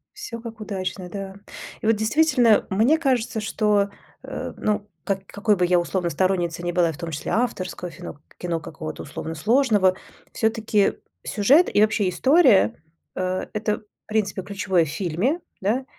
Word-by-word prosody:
Всё 415 - -7
как 230 -2 -8
удачно, 190 -3 -4
да. 195 0 -6 0.5
И - - -5
вот 225 - +4
действительно, 240 0 +3
мне 225 +11 +3
кажется, 250 -7 0
что, 210 -2 +1 0.3
э, - - -5
ну 210 -1 -1 0.2
как 195 -1 -2
какой 205 +1 +1
бы 180 - +2
я 175 0 +4
условно 175 +1 -1
сторонницей 175 -2 0
не 175 - -1
была 175 -2 +3
и - - -1
в 145 - -10
том 170 -2 -5
числе 150 - -4
авторского 190 -7 -2
фино 145 - -9 0.2
кино, 170 -2 -2
какого-то 155 0 -7
условно 160 +2 -6
сложного, 210 - +3 0.4
всё-таки 220 -2 +1 0.3
сюжет 270 - +4
и 205 - +4
вообще 215 -2 +3
история- 260 - +5 0.4
э, 185 0 -1
э, 215 - -1
то 210 -1 0
в 210 - -32
принципе 210 -3 -1
ключевое 190 -2 +1
в - - -7
фильме, 195 - -1 0.2
да. 235 +7 0
200 Hz, 165 wpm, -23 LUFS, 180-225 Hz, 0.5 s, история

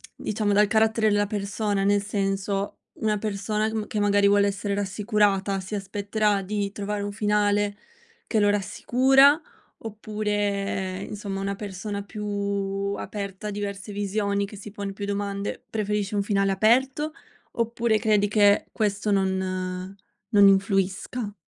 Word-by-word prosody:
diciamo, 210 -1 -1
dal 210 +1 +5
carattere 220 +1 +3
della 205 0 +2
persona? 205 0 -1
Nel 205 +1 +3
senso, 195 0 -2 0.2
una 215 -1 +1
persona 210 +1 -1
che 220 - -4
ma 215 -1 -2
che 210 - -2
magari, 205 0 +4
vuole 200 0 +4
essere 200 0 -2
rassicurata 200 -1 +1
si 190 +3 -5
aspetterà 205 +1 0
di 200 +1 -2
trovare 205 0 -3
un 205 - -3
finale 205 0 +1 0.5
che 220 - +1
lo 205 0 +4
rassicura 265 - +4 0.4
oppure, 205 -3 -2
insomma, 200 -2 -5
una 200 0 -2
persona 200 0 -5
più 210 +1 -7 0.7
aperta 200 0 -5
a - - -3
diverse 200 0 -5
visioni, 200 0 -1
che 200 +1 -10
si 205 +1 -9
pone 200 -1 -5
più 200 +1 -5
domande, 200 0 -3
preferisce 210 -1 -1
un 200 - +1
finale 195 -1 +1
aperto, 260 +9 +2 0.4
oppure 230 -1 +1
credi 210 -2 +3
che 205 -1 +4
questo 210 -1 -1
non 190 -1 -1 0.4
non 200 -2 +7
influisca? 195 +3 +1
205 Hz, 140 wpm, -25 LUFS, 200-210 Hz, 0.7 s, non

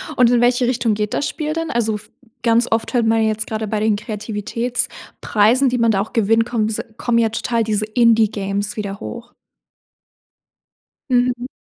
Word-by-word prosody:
Und 245 -1 +5
in 240 - +3
welche 245 +1 +3
Richtung 240 -3 +1
geht 210 0 -2
das 285 - 0
Spiel 305 -1 -3
dann? 330 0 -3
Also, 225 -2 0
f 210 - -10 0.3
ganz 235 +1 +3
oft 225 +3 -1
hört 240 -2 +2
man 225 0 +3
ja 220 - +2
jetzt 215 0 -2
grade 220 0 -3
bei 210 +1 -1
den 215 0 +2
Kreativitätspreisen, 220 +2 -1
die 250 - -1
man 230 -1 +3
da 195 -2 +1
auch 210 - -6
gewinnt, 225 +1 +2
kommen 230 -3 -1
diese 220 - -2
kommen 240 -1 0
ja 225 - +2
total 230 +1 -1
diese 215 -1 -1
Indie-Games 215 -3 +1
wieder 200 -1 -4
hoch. 235 0 -8 1.8
Mhm. 250 0 +1
225 Hz, 180 wpm, -19 LUFS, 215-240 Hz, 1.8 s, Und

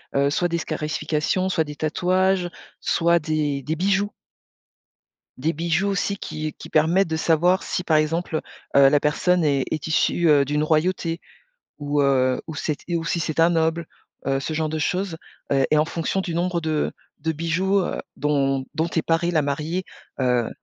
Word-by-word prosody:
heu, 140 +1 +3
soit 175 +3 +1
des 170 0 -1
scarifications, 155 +4 -1
soit 160 -3 +1
des 150 -1 -8
tatouages, 180 +4 +1 0.3
soit 170 0 +2
des 150 -3 -1
des 155 +4 -2
bijoux 200 +3 +1 1.3
des 155 +5 0
bijoux 170 +5 0
aussi 200 +1 -1
qui 155 -3 -5
qui - - -11
permettent 165 +4 +3
de 160 - -1
savoir 175 +4 +3
si 180 - -2
par 155 -2 +3
exemple, 160 +1 0 0.4
heu - - +7
heu, - - +8
la 145 - +4
personne 175 +3 +2
est 140 -3 +2
est 155 - -2
issue, 165 +1 +2
heu, 140 -2 +5
d'une 150 +2 0
royauté 165 +2 0 0.6
ou 145 0 0
heu, 130 -2 +2
ou 160 - -6
cet 150 0 -2
et 175 - -1
ou 165 - -4
si 170 - 0
c'est 160 0 -2
un 165 +1 +5
noble, 165 0 +1 0.4
heu, 135 0 +1
ce 155 - -4
genre 155 0 -1
de 155 0 -3
choses, 180 +2 -1 0.4
heu, 135 -1 +3
et 155 - +4
en 155 - +4
fonction 170 +4 -2
du 170 -3 -4
nombre 175 0 0
de 155 -1 0 0.3
de 160 - -1
bijoux, 180 +5 +1
heu, - - -3 0.2
dont 135 -2 +1
dont 160 +2 0
est 160 - +2
parée 165 +1 +1
la 155 -3 +2
mariée, 155 +6 -2 0.4
heu, 125 -2 +1
160 Hz, 185 wpm, -23 LUFS, 150-175 Hz, 1.3 s, heu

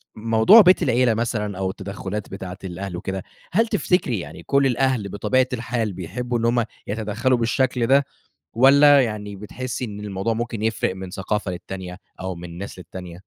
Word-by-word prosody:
موضوع 115 - +6
بيت 185 -1 +5
العيلة 120 -1 +3
مثلًا 105 -3 -2
أو 95 -1 -1
التدخلات 100 +1 -6
بتاعة 95 -1 -7
الأهل 95 0 -5
وكده، 95 +1 -4 0.3
هل 225 +6 +3
تفتكري 180 - +1
يعني 80 -2 -9
كل 140 0 +2
الأهل 125 -5 0
بطبيعة 130 +6 +1
الحال 115 -3 -2
بيحبوا 120 +8 -3
إن 115 - -1
هُم 120 0 +2 0.2
يتدخلوا 110 +4 0
بالشكل 120 +1 +1
ده 140 +1 +4 0.5
والّا 140 +3 +7
يعني 105 -3 -4
بتحسّي 125 +5 -5
إن 105 -3 -7
الموضوع 105 +2 -2
ممكن 115 -1 -4
يفرق 110 -4 0
من 95 -1 -7
ثقافة 100 +1 -2
للتانية 90 +1 -7 0.2
أو 95 -1 -4
من 85 0 -9
ناس 100 0 -7
للتانية؟ 90 0 -9
110 Hz, 165 wpm, -22 LUFS, 95-125 Hz, 0.5 s, والّا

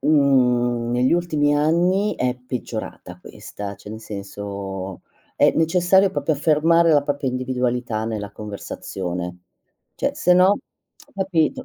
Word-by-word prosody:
mhmm, 125 -5 +2
negli 125 +3 +2
ultimi 150 -4 +1
anni 175 +7 +2
è 125 0 -1
peggiorata 120 -7 -6
questa, 100 +2 -8
cioè 105 - -13
nel 110 +1 -7
senso, 100 -2 -6 0.3
è - - +4
necessario 180 +4 +3
proprio 145 +2 0
affermare 160 +3 +3
la 145 - +4
propria 145 -1 -2
individualità 125 -3 -2
nella 105 -2 -4
conversazione. 90 -4 -6 0.6
Cioè, - - -1
se 180 - +3
no 185 +3 +5 0.6
capito. 190 - 0
130 Hz, 120 wpm, -22 LUFS, 105-160 Hz, 0.6 s, no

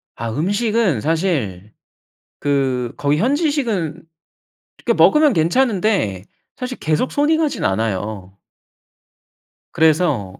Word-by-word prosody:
아 115 0 -4
음식은 200 - 0
사실 140 - -2 0.7
그 130 -4 -1
거기 145 +1 +1
현지식은 235 - -1 0.8
그렇게 - - +2
먹으면 300 -2 +5
괜찮은데 185 - +1 0.3
사실 255 0 -5
계속 155 +11 -1
손이 295 +2 +2
가지는 310 - 0
않아요. 100 -1 -3 1.3
그래서 150 - +1
160 Hz, 220 characters per minute, -19 LUFS, -, 1.3 s, 먹으면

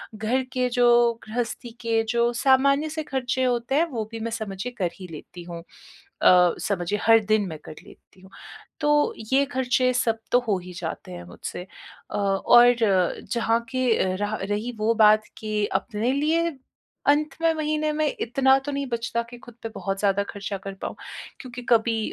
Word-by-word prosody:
घर 225 +5 0
के 255 -1 +1
जो 240 -1 +4
गृहस्थी 235 +1 -4
के 230 -1 +1
जो 235 0 +2
सामान्य 275 +3 +4
से 315 0 -4
खर्चे 260 -3 -2
होते 245 +1 0
हैं 320 +4 +4
वो 225 -4 -3
भी 225 - -6
मैं 230 +1 -4
समझिए 220 +1 -5
कर 180 -4 -1
ही 185 - -8
लेती 175 +3 -10
हूँ 170 -1 -8 0.6
अ, 180 -1 +6
समझिए 200 +1 -2
हर 225 0 +6
दिन 215 0 +2
मैं 160 -3 -6
कर 155 - -9
लेती 185 - -19
हूँ। 190 - -16 0.5
तो 295 -1 +2 0.2
ये 275 +1 +5
खर्चे 255 -1 +1
सब 230 -3 +1
तो 245 - +5
हो 205 -3 +2
ही 180 0 -10
जाते 170 - -6
हैं 85 -1 -8
मुझसे 90 - -7 0.5
अ, - - -4
और 240 +5 +5 0.6
जहाँ 230 0 +1
के 235 -7 +1
रहा 205 +2 -2
रही 210 +4 -2
वो 220 +2 +2
बात 215 -1 +5
कि 215 -1 -1 0.2
अपने 230 +2 -2
लिए 315 +4 +1 0.6
अंत 290 0 +2
में 330 0 +3
महीने 310 0 -1
में 310 0 0
इतना 265 +3 +3
तो 290 - -3
नहीं 280 -1 -3
बचता 235 -1 -2
कि 245 - -10
ख़ुद 240 - -13
पे 225 - -4
बहुत 195 0 -3
ज़्यादा 200 0 +2
खर्चा 200 0 -5
कर 195 +1 -8
पाऊँ, - - -4 0.4
क्योंकि 250 -1 -8
कभी 230 -1 +3
235 Hz, 180 wpm, -24 LUFS, 205-260 Hz, 0.6 s, अ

